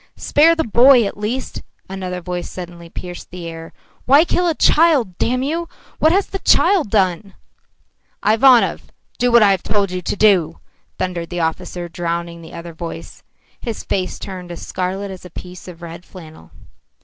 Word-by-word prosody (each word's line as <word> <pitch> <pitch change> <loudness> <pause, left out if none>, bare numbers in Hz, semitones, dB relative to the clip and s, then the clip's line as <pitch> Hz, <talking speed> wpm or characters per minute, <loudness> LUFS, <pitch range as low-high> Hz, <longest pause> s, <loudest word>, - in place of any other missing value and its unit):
"Spare 325 +3 +4
the 325 - 0
boy 245 +1 +6
at 200 - -4
least!" 225 +6 -4 0.3
another 185 -1 -5
voice 180 0 -5
suddenly 175 -2 -9
pierced 175 +1 -8
the 175 -1 -8
air. 165 0 -8 0.3
"Why 285 +6 +6
kill 355 +1 0
a 330 - +1
child, 295 - +3
damn 255 +2 0
you! 330 +4 -2 0.3
What 315 - +4
has 390 +3 +2
the 390 - -6
child 370 - +3
done?" 195 -1 0 0.9
"Ivanov, 235 +3 +4 0.3
do 245 0 +2
what 235 -2 +7
I 200 -2 +5
told 200 +1 -1
you 185 0 -3
to - - -3
do," 190 -6 +3 0.4
thundered 175 -2 -3
the 175 -1 -3
officer, 170 +2 -3
drowning 170 0 -4
the 160 - -12
other 170 0 -8
voice. 165 +1 -8 0.4
His 230 -3 -5
face 185 -2 -2
turned 180 -2 -8
as 170 - -8
scarlet 190 +2 -3
as 185 - -10
a 180 - -10
piece 180 +2 -10
of 175 -1 -11
red 170 +1 -9
flannel. 160 - -13
185 Hz, 170 wpm, -19 LUFS, 175-240 Hz, 0.9 s, what